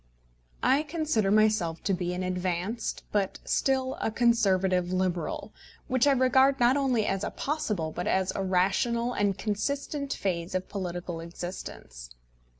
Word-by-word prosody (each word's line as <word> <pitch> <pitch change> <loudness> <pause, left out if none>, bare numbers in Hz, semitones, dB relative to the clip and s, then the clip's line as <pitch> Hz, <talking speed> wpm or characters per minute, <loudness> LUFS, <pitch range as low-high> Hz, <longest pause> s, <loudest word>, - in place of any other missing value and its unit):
I 275 +3 +4
consider 305 - 0
myself 210 -6 +2
to 195 - +1
be 180 -1 -1
an 185 - -3
advanced, 185 +4 -2
but 200 -2 0
still 265 -1 0
a - - +1
Conservative 195 -6 +2
Liberal, 185 -2 -2 0.3
which 255 +1 +2
I 280 - +6
regard 265 +1 +4
not 245 +2 +5
only 255 -6 +1
as 195 0 -1
a - - -1
possible 215 - -2
but 175 +3 -4
as 190 0 +1
a - - -2
rational 195 +6 +1
and 205 -3 +1
consistent 280 +7 -2
phase 175 -2 -2
of 185 - -2
political 175 -3 -4
existence. 165 - -8
200 Hz, 145 wpm, -28 LUFS, 180-250 Hz, 0.3 s, I